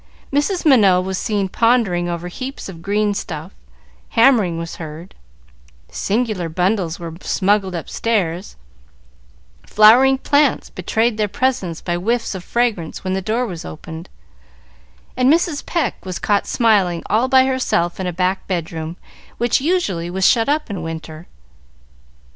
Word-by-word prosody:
Mrs. 335 +6 0
Minot 200 -11 +5
was 190 0 -3
seen 205 -3 -1
pondering 195 -5 +1
over 170 0 -4
heaps 255 +9 -7
of 170 -4 -10
green 205 +2 0
stuff, 160 -2 -6 0.7
hammering 225 -9 +4
was 165 0 -6
heard, 160 +2 -9 0.8
singular 210 -5 -1
bundles 180 0 0
were 165 -2 -6
smuggled 195 -1 +1
upstairs, 180 0 -2 1.1
flowering 245 +6 +6
plants 285 +1 +1
betrayed 220 +5 0
their 210 -1 +1
presence 200 -6 -1
by 175 - -2
whiffs 230 +6 -1
of 190 -2 -7
fragrance 225 -10 -1
when 185 -1 -2
the 190 - -1
door 225 +6 -1
was 175 -6 -6
opened, 160 +2 -9 1.1
and 255 +2 +3
Mrs. 330 -2 +1
Pecq 325 -9 -1
was 185 -2 -5
caught 205 -1 0
smiling 200 -7 +2
all 230 +4 +1
by 260 0 +5
herself 255 -10 0
in 185 - -2
a - - -1
back 185 +2 -1
bedroom, 165 -2 -4 0.4
which 240 +2 +1
usually 235 - 0
was 190 +1 +2
shut 230 +1 +3
up 300 +1 0
in 190 -4 -4
winter. 160 0 -7
195 Hz, 140 wpm, -19 LUFS, 175-240 Hz, 1.1 s, flowering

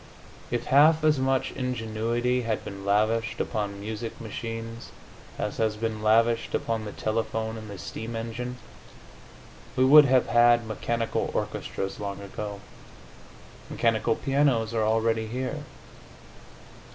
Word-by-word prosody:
If 120 - -2
half 155 +3 +5
as 155 -3 +4
much 130 0 +1
ingenuity 120 0 -1
had 115 -2 -2
been 100 -1 -7
lavished 110 +3 +1
upon 105 -3 -2
music 110 +2 -5
machines 115 +1 -6 0.5
as 105 - -3
has 110 -1 +1
been 110 -1 -3
lavished 115 +2 +3
upon 115 -1 -2
the 105 - -5
telephone 110 +1 -2
and 110 -1 -8
the 100 - -7
steam 110 +5 -6
engine, 125 +2 -4 1.2
we 130 0 +4
would 150 +2 +9
have 130 -2 +4
had 120 0 +5
mechanical 115 +1 -2
orchestras 95 0 -3
long 100 -1 -4
ago. 100 0 -6 1.1
Mechanical 115 -1 +1
pianos 135 -5 +1
are 110 -2 +1
already 110 0 +1
here. 125 +3 -4
115 Hz, 125 wpm, -27 LUFS, 110-120 Hz, 1.2 s, would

